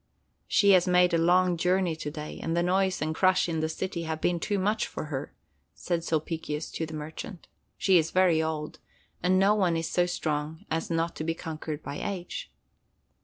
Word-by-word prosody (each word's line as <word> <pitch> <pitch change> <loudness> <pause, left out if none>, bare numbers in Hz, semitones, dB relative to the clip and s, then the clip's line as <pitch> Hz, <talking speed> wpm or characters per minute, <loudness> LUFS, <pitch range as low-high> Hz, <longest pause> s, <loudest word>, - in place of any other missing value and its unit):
"She 200 -1 +4
has 185 -1 +5
made 180 -1 +4
a - - +4
long 180 +1 +3
journey 180 0 +1
to 150 - -4
day, 150 0 -7
and 165 +1 -1
the 170 - +2
noise 190 -1 +1
and 155 0 -1
crush 185 +2 +3
in 165 -2 -1
the 160 0 0
city 170 +1 -3
have 160 -1 -3
been 175 +1 +1
too 205 +4 -1
much 210 +3 0
for - - -6
her," 135 +2 -4 0.4
said 170 -2 -2
Sulpicius 160 -1 -2
to 160 - -3
the 160 - -7
merchant. 160 +5 -7 0.3
"She 190 -3 +5
is 160 0 0
very 180 -3 +3
old, 155 -1 -3 0.4
and 185 +1 +3
no 195 +2 +5
one 185 -5 +2
is 165 0 -2
so 175 0 +2
strong 155 +1 -3
as 160 +1 -1
not 165 0 -1
to - - -3
be 165 +1 -1
conquered 160 -2 -6
by 140 - -5
age." 200 - -5
170 Hz, 200 wpm, -28 LUFS, 160-185 Hz, 0.4 s, has